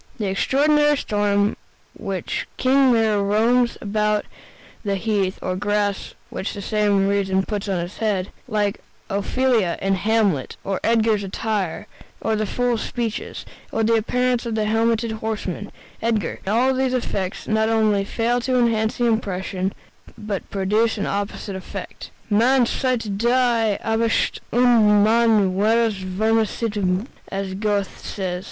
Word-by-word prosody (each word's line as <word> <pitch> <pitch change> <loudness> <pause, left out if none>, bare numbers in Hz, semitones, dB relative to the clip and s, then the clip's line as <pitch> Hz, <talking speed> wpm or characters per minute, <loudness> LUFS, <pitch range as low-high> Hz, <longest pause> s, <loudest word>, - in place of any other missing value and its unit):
The 215 - -2
extraordinary 295 +8 +3
storm 205 -4 0
during 205 +1 +2 0.5
which - - -3
King 265 0 +4
Lear 220 -3 +3
roams 230 +4 +2
about 210 0 0 0.6
the 200 -2 0
heath, 195 -2 0
or 185 - -1
the 185 - -2
grass 205 -1 -1 0.2
which 190 - -4
for 205 - -6
some 205 -2 +2
reason 195 -1 +1
he - - -6
puts 205 -2 -3
on 190 -2 0
his 175 +3 -6
head 205 -4 -1 0.2
like 210 -3 -1 0.3
Ophelia 210 -2 +1
in 195 0 +1
"Hamlet" 200 - +1
or 195 -1 -2
Edgar's 220 -2 +2
attire, 195 -2 -2 0.3
or 220 - 0
the 215 0 -1
fool's 245 +1 0
speeches, 235 -2 -4 0.3
or 225 - 0
the 225 +1 +3
appearance 245 +2 +1
of 225 - -2
the 215 -1 0
helmeted 225 +1 +1
horseman, 215 -3 -4 0.3
Edgar 220 -6 -1
all 245 +6 +3
these 260 0 0
effects 195 -6 -3
not 220 0 +2
only 215 -3 +2
fail 235 +4 0
to 255 +1 0
enhance 225 -2 +1
the 240 - +1
impression, 190 -4 -1 0.5
but 210 -3 -5
produce 210 +4 +1
an 205 - -1
opposite 200 0 -3
effect. 190 - -8 0.2
"Man 240 +4 +4
sieht 230 -6 -1
die 235 -3 +2
Absicht 225 0 +1
und 225 -4 +5
man 220 -3 +4
wird 225 +3 +3
verstimmt," 205 0 0 0.2
as 195 -1 -3
Goethe 205 0 -1
says. 185 -3 -4
215 Hz, 145 wpm, -22 LUFS, 200-230 Hz, 0.6 s, und